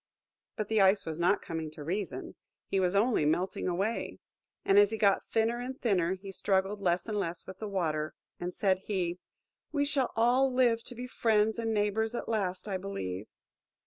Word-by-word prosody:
But 215 - -3
the 220 -1 +3
Ice 195 +1 +4
was 160 0 -4
not 175 +4 +2
coming 160 -2 -4
to 150 - -8
reason–he 195 +2 -4
was 185 0 +1
only 220 -3 +3
melting 175 +5 0
away. 195 +6 -1 0.5
And 195 +1 +6
as 205 -1 +6
he 220 - -3
got 200 -2 +2
thinner 225 +2 +1
and 255 +2 -5
thinner, 190 -5 +1
he 195 +1 -9
struggled 195 +1 0
less 175 -2 +1
and 210 -2 -2
less 170 -3 -4
with 190 0 -10
the 215 - -4
Water; 155 -6 -1 0.2
and 175 +1 -3
said 190 -1 +1
he, 180 -3 -2 0.5
"We 285 -2 +1
shall 280 -3 0
all 250 +4 +4
live 240 -3 +3
to 245 - -9
be 245 +2 -5
friends 220 -2 +2
and 225 -1 -1
neighbours 220 +2 0
at - - -4
last, 195 -4 -1
I 195 -2 -1
believe." 100 - -5
200 Hz, 185 wpm, -30 LUFS, 180-225 Hz, 0.5 s, And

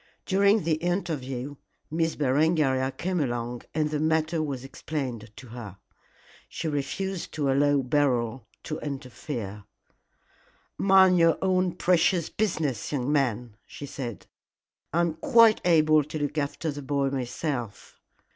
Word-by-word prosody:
During 200 +2 +3
the 160 -1 +1
interview 145 -7 -3 0.3
Miss 160 0 0
Berengaria 140 -2 +2
came 180 +6 -2
along 120 -3 -2
and 155 -1 0
the 150 - -1
matter 160 +1 +1
was 140 -5 -3
explained 135 -5 -5
to 125 - -12
her. 110 -5 -9 0.7
She 165 - -4
refused 170 +6 -3
to 145 -3 0
allow 140 0 +3
Beryl 125 -4 0 0.2
to 155 - -4
interfere. 125 -7 -6 1.1
"Mind 190 -2 +5
your 165 -1 +4
own 185 -1 +2
precious 175 -1 +2
business, 155 - -1
young 140 -1 -1
man," 120 -6 0
she 145 - -8
said. 125 -6 -6 0.7
"I 170 - +2
am 170 -2 +1
quite 230 -6 +5
able 155 -3 +5
to 155 +1 -6
look 145 0 -2
after 150 +1 -2
the 145 0 -7
boy 140 0 0
myself." 125 -3 -4
145 Hz, 130 wpm, -27 LUFS, 130-165 Hz, 1.1 s, Mind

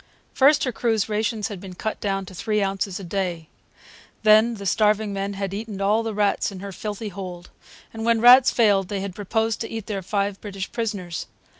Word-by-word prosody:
First 280 +2 +5
her 255 - 0
crew's 225 -3 0
rations 215 0 -1
had 200 -4 -7
been 185 -2 -9
cut 220 +4 -4
down 195 -1 -2
to 185 - -11
three 210 +4 -1
ounces 195 -1 -1
a - - -8
day. 175 -3 -3 0.7
Then 220 +2 +5
the 200 -2 -8
starving 210 +1 +2
men 195 +1 -3
had 195 -1 -4
eaten 210 -1 -5
all 205 +3 +2
the 225 -2 -4
rats 210 +2 +1
in 190 - -8
her 200 +1 -7
filthy 210 +3 -5
hold; 180 -2 -8 0.4
and 225 0 -5
when 230 0 +3
rats 250 +3 +8
failed 200 -5 +3
they 195 0 -3
had 195 -1 -5
proposed 220 +3 -1
to 225 - -4
eat 225 -2 -5
their 200 -3 -3
five 200 +1 -2
British 195 -2 -6
prisoners. 205 -7 -4
205 Hz, 200 wpm, -23 LUFS, 195-220 Hz, 0.7 s, rats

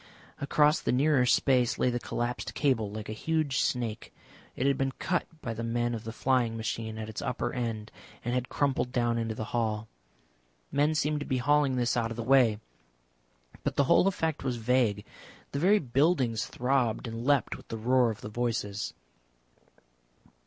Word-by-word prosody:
Across 150 +2 +3
the - - 0
nearer 135 -1 +3
space 125 -2 +3
lay 125 - +2
the 120 - -1
collapsed 120 0 -3
cable 125 -8 +1
like 105 +1 -6
a - - -5
huge 155 +2 0
snake. 115 -3 -2 0.4
It 130 - -1
had 140 0 +3
been 135 0 -1
cut 175 +5 -1 0.2
by 115 - -3
the 115 - -5
men 120 +1 0
of 115 -1 -5
the 110 - -4
flying 120 -1 +1
machine 110 0 -4
at 110 -1 -5
its 110 - -6
upper 120 0 -2
end, 115 -3 -3 0.3
and 120 - -1
had 125 0 -1
crumpled 135 -3 0
down 120 -2 +1
into 115 -1 -2
the 110 - -4
hall. 110 -2 -1 0.8
Men 150 +2 +2
seemed 150 -1 +1
to 145 - -5
be 130 - 0
hauling 145 +1 +2
this 120 -2 +1
out 115 -2 0
of 115 - -6
the 115 - -3
way. 120 -4 +4 1.0
But - - -1
the 140 - +4
whole 160 +7 +4
effect 160 -5 -1
was 130 -2 -1
vague, 115 -3 +1 0.5
the 140 - -2
very 195 +7 +5
buildings 130 - +1
throbbed 125 -2 0
and 115 +1 -5
leapt 140 +1 +2
with - - -14
the 115 - -5
roar 125 +2 +3
of 110 -1 -5
the - - -6
voices. 110 -3 -2
125 Hz, 180 wpm, -29 LUFS, 115-135 Hz, 1.0 s, very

